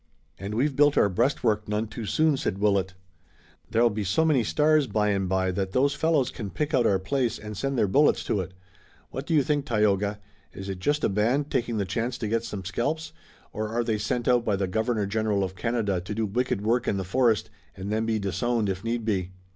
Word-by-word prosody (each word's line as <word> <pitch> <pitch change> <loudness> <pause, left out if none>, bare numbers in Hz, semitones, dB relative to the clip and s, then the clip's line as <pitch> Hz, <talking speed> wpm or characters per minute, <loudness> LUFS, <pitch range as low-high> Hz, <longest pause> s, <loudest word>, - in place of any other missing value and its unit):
"And 100 +2 -5
we've 135 +4 +1
built 145 +1 +4
our 100 - +5
breastwork 110 0 +1
none 105 +1 0
too 110 0 -7
soon," 155 +7 +3
said 130 -8 -2
Willet. 100 -2 +1 0.7
"There'll 115 +1 +3
be 105 0 -3
so 100 - +1
many 145 -7 +3
stars 150 +4 +3
by 105 -2 +1
and 95 -2 0
by 95 0 +1
that 95 +1 -3
those 140 +2 +3
fellows 155 -5 +1
can 105 -4 -6
pick 150 +8 -3
out 120 -3 +4
our 95 - +3
place 115 +6 -1
and 105 0 -8
send 135 +5 -2
their 105 - +3
bullets 145 +10 +3
to 100 - 0
it. 95 0 -8 0.6
What 135 +2 -6
do 165 - +1
you 145 - +4
think, 145 0 0
Tayoga? 105 -2 +1 0.4
Is 95 0 -7
it 95 -2 -4
just 145 +9 0
a - - +4
band 120 +9 0
taking 120 -2 -1
the 100 - 0
chance 115 +6 -2
to 110 - -3
get 115 +1 0
some 105 -5 -6
scalps, 150 - -2 0.4
or 110 0 -3
are 120 +2 0
they 110 -2 -1
sent 115 +3 -2
out 125 -1 +4
by 105 -3 +1
the 95 0 -1
Governor 110 +2 0
General 105 -1 0
of 95 0 -4
Canada 105 -3 -1
to 100 +4 -6
do 110 0 0
wicked 120 +1 -1
work 120 +3 +1
in 100 - +1
the 95 - -2
forest 115 +2 +1 0.2
and 95 +2 -5
then 110 +1 0
be 110 -1 +1
disowned 105 +2 -1
if 95 0 -3
need 115 0 -2
be?" 95 -5 0
110 Hz, 225 wpm, -26 LUFS, 100-125 Hz, 0.7 s, our